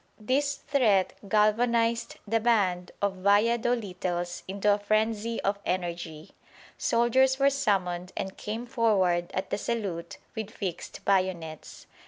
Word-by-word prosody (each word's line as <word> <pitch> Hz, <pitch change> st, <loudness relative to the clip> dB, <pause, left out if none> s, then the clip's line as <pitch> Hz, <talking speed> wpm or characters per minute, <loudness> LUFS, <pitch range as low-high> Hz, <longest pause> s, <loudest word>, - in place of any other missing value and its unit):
This 280 Hz, +6 st, +1 dB
threat 215 Hz, -9 st, +2 dB, 0.2 s
galvanised 230 Hz, +2 st, +2 dB
the 225 Hz, +2 st, +2 dB
band 195 Hz, -6 st, +1 dB
of 195 Hz, -1 st, 0 dB
Vallado 230 Hz, +5 st, +3 dB
littles 175 Hz, -3 st, -4 dB
into 200 Hz, +2 st, +2 dB
a 205 Hz, -, -1 dB
frenzy 220 Hz, +2 st, 0 dB
of 200 Hz, +1 st, 0 dB
energy. 170 Hz, -3 st, -4 dB, 0.4 s
Soldiers 260 Hz, +3 st, +3 dB
were 275 Hz, 0 st, +4 dB
summoned 185 Hz, -8 st, 0 dB
and 190 Hz, 0 st, -3 dB
came 220 Hz, +3 st, -5 dB
forward 195 Hz, -8 st, +2 dB
at 185 Hz, -, -3 dB
the -, -, -1 dB
salute 200 Hz, -9 st, -3 dB, 0.2 s
with 220 Hz, -2 st, -4 dB
fixed 190 Hz, -5 st, -6 dB
bayonets. 185 Hz, -5 st, -1 dB
205 Hz, 125 wpm, -28 LUFS, 185-230 Hz, 0.4 s, were